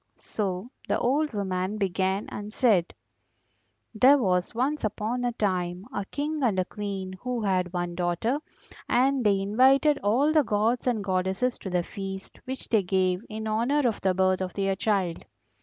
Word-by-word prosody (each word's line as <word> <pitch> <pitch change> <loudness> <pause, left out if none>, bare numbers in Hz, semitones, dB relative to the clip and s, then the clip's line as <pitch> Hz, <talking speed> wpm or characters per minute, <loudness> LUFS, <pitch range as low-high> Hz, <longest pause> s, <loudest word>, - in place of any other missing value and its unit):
So 200 +2 -4 0.2
the - - +1
old 295 +5 +1
woman 190 -1 -2
began 190 0 0
and 205 +1 -6
said: 210 -8 +2 1.0
"There 260 +6 +6
was 185 -4 0
once 275 +5 0
upon 215 +3 -2
a 245 - +1
time 185 -3 -1
a 200 - -2
King 300 +7 -3
and 225 -7 +2
a 185 - +1
Queen 195 -2 -5
who 250 -1 -2
had 185 -3 +1
one 175 -1 -2
daughter, 180 - 0 0.5
and 265 +1 +3
they 200 -2 +3
invited 265 +9 +4
all 255 +10 +2
the 310 - +6
gods 225 +3 0
and 225 -5 +1
goddesses 190 +6 0
to 190 - -6
the 180 -1 0
feast 195 +1 -7
which 260 0 -6
they 220 -3 +3
gave 185 0 +1
in 220 0 -5
honour 245 +6 +1
of 225 - -2
the 190 -1 +1
birth 185 0 +2
of 185 -1 -4
their 195 -1 0
child. 190 -4 0
205 Hz, 170 wpm, -27 LUFS, 185-245 Hz, 1.0 s, There